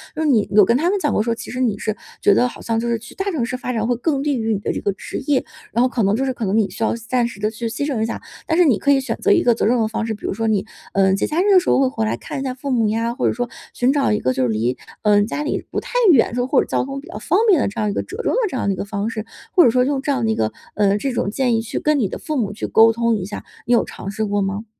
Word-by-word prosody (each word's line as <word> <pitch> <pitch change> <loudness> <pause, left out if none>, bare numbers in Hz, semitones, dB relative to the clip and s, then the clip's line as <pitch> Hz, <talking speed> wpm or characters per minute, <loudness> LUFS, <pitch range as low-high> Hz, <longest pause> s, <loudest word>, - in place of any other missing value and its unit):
就 310 - -3
是 315 - +1
你 230 -8 +3
有 210 0 +7
跟 235 +4 +3
他 330 +6 +1
们 405 +1 +1
讲 295 -6 0
过 210 - +2
说 230 0 0
其 230 - -8
实 250 - -5
你 225 -5 +1
是 215 +1 -2 0.3
觉 205 - +5
得 250 - +3
好 245 - -10
像 225 -1 -1
就 235 - -2
是 235 -1 0
去 220 - -13
大 390 0 -2
城 285 -8 -1
市 255 - -4
发 250 0 -4
展 225 -1 -1
会 245 - +1
更 275 +3 -1
利 285 -2 0
于 225 -1 0
你 200 - -1
的 - - -2
这 - - -3
个 200 - 0
职 - - -7
业， 285 -3 +2 0.3
然 235 - +2
后 255 - +4
可 240 -3 -1
能 200 +1 +2
就 260 - -1
是 260 - -1
可 235 - -4
能 195 +2 +1
你 215 -3 +2
需 225 - -5
要 - - +1
牺 230 -1 -8
暂 245 -2 +1
时 230 -4 -10
地 210 +1 0
去 230 +1 -5
牺 285 +5 -3
牲 270 -7 -1
一 - - +2
下 230 - -5 0.3
但 320 - +1
是 355 - +6
你 255 -9 +4
可 285 - +2
以 275 - +4
选 265 - -3
择 415 - +1
一 365 - +5
个 240 - +4
责 - - 0
任 240 +4 +3
的 220 - +2
方 225 0 -3
式， 225 - -2
比 210 - -9
如 - - -1
说 225 +3 -2
你， 210 -2 +1 0.3
嗯， 190 -1 +3
节 195 - 0
假 320 +4 0
日 400 +1 +4
的 375 - +8
时 360 - -3
候 - - +4
会 270 - +4
回 110 - -2
来 110 +2 -1
看 270 - -6
一 270 - -3
下 260 - -2
父 265 +2 -6
母 230 -4 +2
呀， 230 +2 -1
或 - - 0
者 - - +1
说 245 +1 -3 0.2
寻 245 +2 +2
找 280 -5 +2
一 210 - +1
个 130 - 0
就 130 - 0
是 125 - +1
离 115 +3 0 0.3
呃， 205 -1 +4
家 235 +7 -3
里 295 - -2
不 - - -1
太 - - -10 0.2
远， 265 -8 +5
这 - - -7
种 245 0 0
或 - - +3
者 - - -4
交 - - 0
通 275 +1 -5
比 305 - -15
较 340 - -7
方 360 +6 +1
便 380 -8 +5
的 - - +1
这 205 - -7
样 210 -1 +1
一 200 - -2
个 - - -2
折 410 +5 -6
中 - - 0
的 - - +2
这 260 - -4
样 - - -1
的 200 - +2
一 - - -4
个 - - -4
方 205 +1 -3
式， 220 -1 -5 0.3
或 360 - +8
者 - - +6
说 250 +2 +2
用 275 0 0
这 285 - -1
样 260 -4 0
的 220 - +1
一 - - 0
个 110 - 0 0.2
呃， 200 -1 +3
这 270 +6 -2
种 215 - -1
建 245 -1 +1
议 225 - +1
去 225 - -4
跟 305 0 +2
你 220 - +1
的 - - -5
父 310 - -4
母 210 -5 0
去 210 - -4
沟 225 +1 +6
通 235 0 +1
一 195 -4 -3
下， 205 - -7 0.2
你 240 - +2
有 235 - +3
尝 195 - -7
试 220 +2 -2
过 205 0 0
吗？ 195 +3 -3
230 Hz, 390 characters per minute, -20 LUFS, 210-270 Hz, 0.3 s, 的